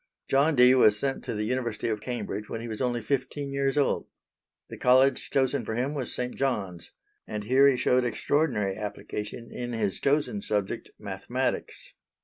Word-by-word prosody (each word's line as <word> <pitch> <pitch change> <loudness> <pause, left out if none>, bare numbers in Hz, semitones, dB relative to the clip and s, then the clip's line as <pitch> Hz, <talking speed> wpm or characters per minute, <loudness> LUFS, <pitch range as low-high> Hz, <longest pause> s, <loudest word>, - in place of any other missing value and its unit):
John 145 +3 +3
Dee 125 0 +7
was 110 -5 +5
sent 135 +4 -2
to - - -3
the 105 - -1
University 120 -1 -2
of 110 -2 -2
Cambridge 115 -3 -4
when 115 - -4
he 115 - -6
was 110 +1 -5
only 120 -2 0
fifteen 140 +3 -2
years 140 +1 0
old. 145 - +1 0.6
The - - -9
College 130 +2 +4
chosen 130 -1 +1
for 110 +1 -4
him 130 +5 -1
was 135 -4 -4
St. 125 0 -3
John's, 100 -11 -2 0.4
and 105 -1 -4
here 130 +5 +5
he 135 -2 +4
showed 125 0 +3
extraordinary 120 -5 0
application 105 +2 -6
in 120 0 -5
his 105 -4 -1
chosen 150 +9 +1
subject, 105 - -2
mathematics. - - -4
125 Hz, 170 wpm, -27 LUFS, 105-135 Hz, 0.6 s, Dee